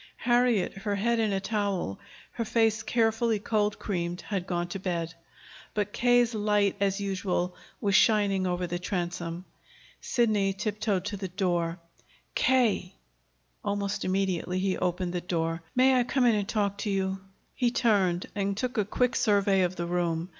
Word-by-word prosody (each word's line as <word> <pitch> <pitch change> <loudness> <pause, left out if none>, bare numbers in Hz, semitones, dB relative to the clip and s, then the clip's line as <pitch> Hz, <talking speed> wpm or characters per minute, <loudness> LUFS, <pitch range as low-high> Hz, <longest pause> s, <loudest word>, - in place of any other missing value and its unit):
Harriet, 240 -4 +2
her 205 0 -1
head 235 +3 +1
in 220 -2 +1
a 195 - 0
towel, 195 - -2 0.3
her 230 - -3
face 225 -1 +2
carefully 225 0 +1
cold 210 0 0
creamed, 175 -3 -3
had 195 -3 -3
gone 175 -1 -1
to 185 +3 -5
bed; 170 -3 -2 0.6
but 210 -1 -1
K.'s 245 -1 +3
light, 210 -2 +2
as 195 0 +1
usual, 185 -2 -1 0.2
was 200 -4 0
shining 200 -2 +4
over 180 0 -1
the 175 0 -3
transom. 175 -1 -3 0.6
Sidney 210 -5 +1
tiptoed 205 -1 -1
to 205 0 -3
the 190 -1 -4
door. 175 -3 -1 0.6
"K.!" 225 -8 +2 0.7
Almost 200 0 -2
immediately 185 -1 0
he 185 0 0
opened 180 0 -1
the 175 - -2
door. 165 -1 -2
"May 260 +1 +5
I 250 -1 +4
come 250 +1 +1
in 235 - +5
and 205 -1 -1
talk 200 -3 0
to 210 - -2
you?" 190 -1 -1 0.3
He 245 - +1
turned 195 -7 +2
and 200 -1 -1
took 250 0 -2
a 205 - +2
quick 250 +4 0
survey 200 -2 +3
of 180 0 0
the 170 - -3
room. 170 -1 -1
200 Hz, 160 wpm, -28 LUFS, 180-215 Hz, 0.7 s, May